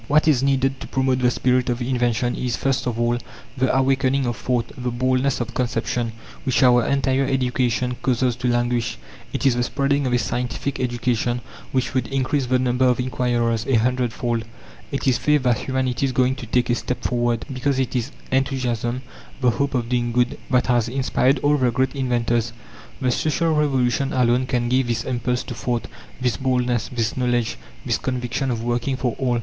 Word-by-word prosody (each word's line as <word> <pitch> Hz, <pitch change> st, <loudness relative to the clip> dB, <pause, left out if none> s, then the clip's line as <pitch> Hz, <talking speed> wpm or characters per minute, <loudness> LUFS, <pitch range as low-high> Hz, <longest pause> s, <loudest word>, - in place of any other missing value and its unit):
What 150 Hz, +2 st, +3 dB
is 140 Hz, -5 st, +4 dB
needed 135 Hz, -1 st, +1 dB
to -, -, -7 dB
promote 130 Hz, -1 st, +1 dB
the 125 Hz, -1 st, +3 dB
spirit 125 Hz, +1 st, +1 dB
of 120 Hz, 0 st, 0 dB
invention 120 Hz, -1 st, 0 dB
is, 125 Hz, -2 st, -1 dB
first 130 Hz, -2 st, 0 dB
of 115 Hz, -2 st, -2 dB
all, 120 Hz, 0 st, +1 dB, 0.4 s
the 130 Hz, -1 st, +1 dB
awakening 135 Hz, 0 st, +2 dB
of 120 Hz, -1 st, -1 dB
thought, 120 Hz, -1 st, -1 dB
the 125 Hz, 0 st, -3 dB
boldness 130 Hz, +2 st, +1 dB
of 120 Hz, 0 st, -4 dB
conception, 120 Hz, -1 st, -1 dB, 0.3 s
which 130 Hz, -2 st, +2 dB
our 125 Hz, -1 st, +6 dB
entire 135 Hz, -1 st, +1 dB
education 125 Hz, -1 st, 0 dB
causes 125 Hz, -1 st, +1 dB
to 125 Hz, 0 st, -2 dB
languish; 120 Hz, -, 0 dB, 0.3 s
it -, -, -3 dB
is 130 Hz, -3 st, +4 dB
the 120 Hz, -, 0 dB
spreading 140 Hz, +2 st, 0 dB
of 125 Hz, -, 0 dB
a -, -, +4 dB
scientific 125 Hz, +3 st, -2 dB
education, 120 Hz, -1 st, 0 dB, 0.3 s
which 130 Hz, -2 st, 0 dB
would 130 Hz, -, 0 dB
increase 135 Hz, 0 st, 0 dB
the 130 Hz, +1 st, +3 dB
number 125 Hz, 0 st, +1 dB
of 125 Hz, -1 st, +3 dB
inquirers 120 Hz, -3 st, 0 dB
a 135 Hz, -, +3 dB
hundredfold; 120 Hz, -1 st, 0 dB, 0.5 s
it 140 Hz, -, -2 dB
is 130 Hz, -, +3 dB
faith 150 Hz, -2 st, +2 dB
that 120 Hz, -4 st, +2 dB
humanity 130 Hz, 0 st, -1 dB
is -, -, -2 dB
going 130 Hz, 0 st, +2 dB
to 120 Hz, -, -7 dB
take 120 Hz, +1 st, +1 dB
a -, -, +4 dB
step 125 Hz, +1 st, -3 dB
forward, 120 Hz, -2 st, 0 dB
because 130 Hz, +1 st, 0 dB
it 130 Hz, -1 st, -1 dB
is 125 Hz, +1 st, -1 dB, 0.2 s
enthusiasm, 130 Hz, -2 st, 0 dB, 0.4 s
the 125 Hz, -2 st, +3 dB
hope 140 Hz, +3 st, -1 dB
of 120 Hz, -2 st, 0 dB
doing 120 Hz, -1 st, 0 dB
good, 120 Hz, +1 st, +1 dB
that 125 Hz, -1 st, +3 dB
has 120 Hz, -2 st, +2 dB
inspired 130 Hz, +1 st, +2 dB
all 145 Hz, +1 st, +4 dB
the 130 Hz, -3 st, +2 dB
great 130 Hz, +2 st, 0 dB
inventors. 120 Hz, -3 st, 0 dB, 0.5 s
The 125 Hz, -2 st, +1 dB
Social 160 Hz, +5 st, +1 dB
Revolution 135 Hz, -3 st, +1 dB
alone 125 Hz, 0 st, +2 dB
can 120 Hz, -2 st, 0 dB
give 130 Hz, +1 st, +2 dB
this 115 Hz, -1 st, -1 dB
impulse 125 Hz, 0 st, -1 dB
to -, -, -6 dB
thought, 120 Hz, -2 st, -2 dB, 0.3 s
this 125 Hz, -4 st, 0 dB
boldness, 125 Hz, -3 st, 0 dB
this 115 Hz, -2 st, -1 dB
knowledge, 120 Hz, -2 st, 0 dB, 0.3 s
this -, -, 0 dB
conviction 125 Hz, +1 st, -2 dB
of 115 Hz, -2 st, -2 dB
working 120 Hz, +2 st, -1 dB
for 125 Hz, -3 st, -1 dB
all. 125 Hz, -3 st, +1 dB
125 Hz, 190 wpm, -22 LUFS, 120-130 Hz, 0.5 s, our